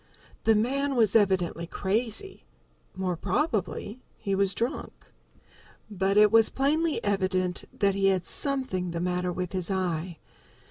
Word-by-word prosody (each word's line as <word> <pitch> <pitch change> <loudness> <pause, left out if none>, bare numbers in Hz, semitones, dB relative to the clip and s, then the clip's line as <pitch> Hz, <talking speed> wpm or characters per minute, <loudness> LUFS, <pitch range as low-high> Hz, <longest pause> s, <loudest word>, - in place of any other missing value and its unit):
The 225 - +5
man 275 +6 0
was 220 -4 +3
evidently 185 -5 +2
crazy 220 - -2 0.5
more 185 -1 -1
probably 225 - -2 0.2
he 195 - -3
was 195 0 +2
drunk. 235 +3 -4 0.8
But 195 0 0
it 210 -1 +6
was 225 -1 +6
plainly 305 +4 0
evident 185 -3 0
that 200 -1 +1
he 195 0 +2
had 185 -2 +1
something 260 -11 -2
the 170 0 -3
matter 180 +1 -1
with 180 0 -4
his 185 -1 -3
eye. 180 -3 -2
195 Hz, 135 wpm, -27 LUFS, 180-225 Hz, 0.8 s, it